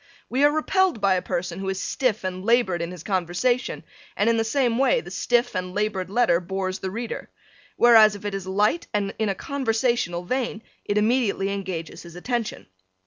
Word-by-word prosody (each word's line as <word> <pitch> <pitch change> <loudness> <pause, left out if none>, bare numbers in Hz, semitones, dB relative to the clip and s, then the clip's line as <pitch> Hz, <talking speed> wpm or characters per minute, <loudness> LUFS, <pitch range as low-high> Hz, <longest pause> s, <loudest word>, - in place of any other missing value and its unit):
We 260 +3 +2
are 290 - +7
repelled 350 - +1
by 195 -2 +3
a 185 - +1
person 175 0 -3
who 195 0 -3
is 190 0 -2
stiff 230 0 -1
and 185 0 -4
labored 215 -6 +2
in 170 - -3
his 180 -3 -9
conversation 195 +7 -1 0.3
and 220 +3 +3
in 230 - +1
the 225 - +2
same 240 0 +1
way 380 - +3
the - - -10
stiff 240 -2 +1
and 185 0 -3
labored 205 -3 -1
letter 205 -5 +3
bores 185 +1 -3
the 190 - -3
reader. 230 +4 -5 0.5
Whereas 220 -3 +7
if 205 - -10
it 205 - -2
is 195 -1 -5
light 210 - +1
and 200 -1 0
in 220 -2 +1
a 195 - -1
conversational 235 -8 -1
vein 235 +1 -2 0.2
it 205 - -1
immediately 210 -3 +1
engages 185 -4 -5
his 170 -1 -12
attention. 235 +4 -3
210 Hz, 195 wpm, -24 LUFS, 185-240 Hz, 0.5 s, are